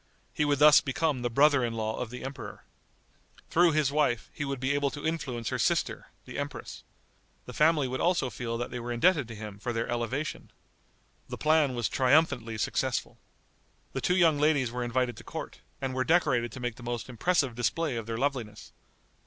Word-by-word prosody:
He 150 - +1
would 145 -1 +2
thus 150 +1 +8
become 140 -1 -1
the 120 - -1
brother 140 +2 +4
in 120 -1 -1
law 110 0 -2
of 125 - -3
the 125 +1 -8
emperor. 135 0 -7 0.9
Through 170 -1 +4
his 150 -3 +2
wife 145 -6 0
he 145 - -4
would 140 -2 -3
be 130 +2 0
able 145 0 +1
to 145 +2 -8
influence 130 -8 -2
her - - -2
sister, - - 0 0.2
the - - -6
empress. - - -6 0.6
The 125 - -9
family 150 0 +3
would 130 +1 -3
also 175 -4 +2
all - - -2
feel 115 -2 -4
that 120 - -4
they 125 - -4
were 120 +1 -5
indebted 145 +2 +3
to 115 - -8
him 105 -1 -8
for 120 - -3
their 115 0 -1
elevation. 120 +5 -3 0.8
The - - -5
plan 150 -4 +3
was 120 -2 0
triumphantly 130 -4 +2
successful. 105 - -2 0.7
The - - -3
two 180 - +2
young 165 -5 +4
ladies 145 -5 +2
were 125 0 -3
invited 120 0 -1
to - - -10
court, - - -7 0.2
and 135 -1 -3
were 130 0 0
decorated 130 -8 +2
to - - -7
make 120 -2 -3
the - - -12
most 120 -1 -4
impressive 135 +2 +1
display 130 +4 -1
of 115 -1 -5
their 115 0 -3
loveliness. 120 -6 -3
130 Hz, 200 wpm, -29 LUFS, 120-150 Hz, 0.9 s, thus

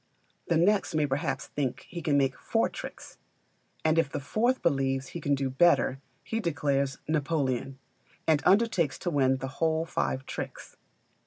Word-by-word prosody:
The 170 - +2
next 190 0 +2
may 155 -1 +3
perhaps 145 +4 -2
think 135 -2 -3
he 170 -1 -6
can 145 -2 +2
make 135 -2 +2
four - - 0
tricks; - - -9 0.7
and 160 +1 +4
if 160 -4 +1
the - - -2
fourth 235 - 0
believes 135 -3 +1
he 170 - -6
can 145 -1 +2
do 135 0 -1
better 135 -2 +3 0.2
he 225 - -2
declares 140 -6 0
Napoleon, 140 -4 -1 0.5
and 155 -2 +3
undertakes 195 - +3
to 175 - -3
win 135 -3 +3
the 135 +1 -4
whole 160 0 +2
five 135 -4 -2
tricks. - - -7
145 Hz, 160 wpm, -28 LUFS, 135-170 Hz, 0.7 s, and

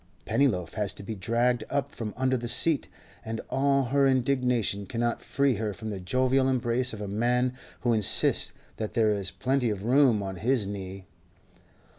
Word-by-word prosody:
Pennyloaf 110 -8 +1
has 105 -3 -1
to - - -8
be 110 - -5
dragged 120 +4 0
up 140 -3 -1
from 110 -3 -6
under 130 0 +1
the 120 -1 -3
seat, 140 +5 +3 0.4
and 110 0 -4
all 140 0 +2
her 140 +2 +2
indignation 125 -6 +1
cannot 120 +2 -1
free 140 -4 +1
her 105 -2 -3
from 110 -1 -6
the 100 - -5
jovial 130 +7 +1
embrace 125 0 +1
of 110 - -7
a 105 - -4
man 125 +5 +1 0.3
who 120 -2 +2
insists 110 -3 +2 0.3
that 110 - -4
there 110 -2 +3
is 100 -2 -1
plenty 130 -2 0
of 100 -2 -3
room 125 -3 +4
on 95 -1 -5
his 115 +2 +1
knee. 95 -1 -7
120 Hz, 175 wpm, -27 LUFS, 105-130 Hz, 0.4 s, room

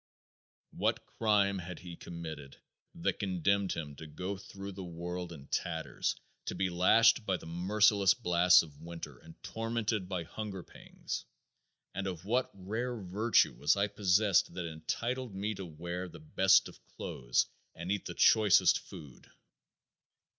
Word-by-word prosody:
What - - -1
crime 100 -3 +2
had 90 0 -7
he 85 -1 -9
committed 80 -5 -8 0.4
that - - -1
condemned 95 +1 +1
him 75 -3 -6
to 80 - -9
go 90 +6 -4
through 100 0 -8
the 95 0 -7
world 90 +1 -5
in 70 -5 -10
tatters 80 -2 -2 0.3
to - - -3
be 95 -1 0
lashed 115 +7 +5
by 95 -3 0
the - - -13
merciless 100 +3 +3
blasts 90 0 +5
of 75 -2 -14
winter 85 0 -8
and 80 0 -14
tormented 115 -4 -2
by 90 -3 -2
hunger 95 +2 -6
pangs, - - -7 0.7
and 95 +1 -3
of 90 -1 -5
what 125 +5 +1
rare 110 +6 -3
virtue 105 +5 +2
was 75 +6 +2
I 100 - +3
possessed 100 -2 +2
that 90 -2 -3
entitled 115 +9 -3
me 105 +3 -2
to 95 -2 -7
wear 85 +3 -5
the - - -12
best 145 -12 +4
of - - -14
clothes - - 0 0.3
and 85 +3 -4
eat 100 -2 -1
the - - -6
choicest 110 -3 +5
food! 70 -5 -12
95 Hz, 150 wpm, -32 LUFS, 85-105 Hz, 0.7 s, lashed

